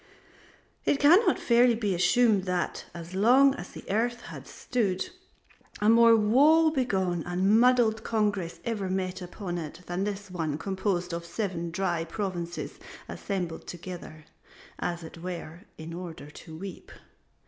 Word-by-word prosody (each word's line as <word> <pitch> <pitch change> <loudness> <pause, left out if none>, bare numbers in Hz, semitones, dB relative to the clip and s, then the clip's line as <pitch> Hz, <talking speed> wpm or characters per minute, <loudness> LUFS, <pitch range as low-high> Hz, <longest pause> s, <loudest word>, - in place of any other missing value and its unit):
It 280 - +1
cannot 345 +10 +5
fairly 240 0 +4
be 210 -4 -1
assumed 195 +3 +3
that, 180 -1 -2
as 170 +1 -9
long 255 +8 +5
as 275 - -8
the - - -10
earth 235 +4 0
has - - -10
stood, 210 - -2 0.7
a 210 - +3
more 230 0 +7
woe 290 +9 +5
begone 190 - 0
and 190 +5 +3
muddled 235 -3 +3
congress 205 -6 -1
ever 210 -5 -2
met 185 0 -2
upon 180 0 -5
it 165 +2 -7
than 175 +2 -2
this 200 -1 -4
one 160 -5 -2
composed 185 0 -2
of 170 0 -3
seven 170 -2 -3
dry 175 -1 -1
provinces 175 -1 -5 0.3
assembled 180 -5 -4
together, 170 -3 -8 0.5
as 175 -1 -3
it 160 +1 -10
were, 175 +1 -7
in 160 +1 -8
order 170 -4 -8
to 160 +1 -11
weep. 190 +1 -9
190 Hz, 140 wpm, -28 LUFS, 175-225 Hz, 0.7 s, more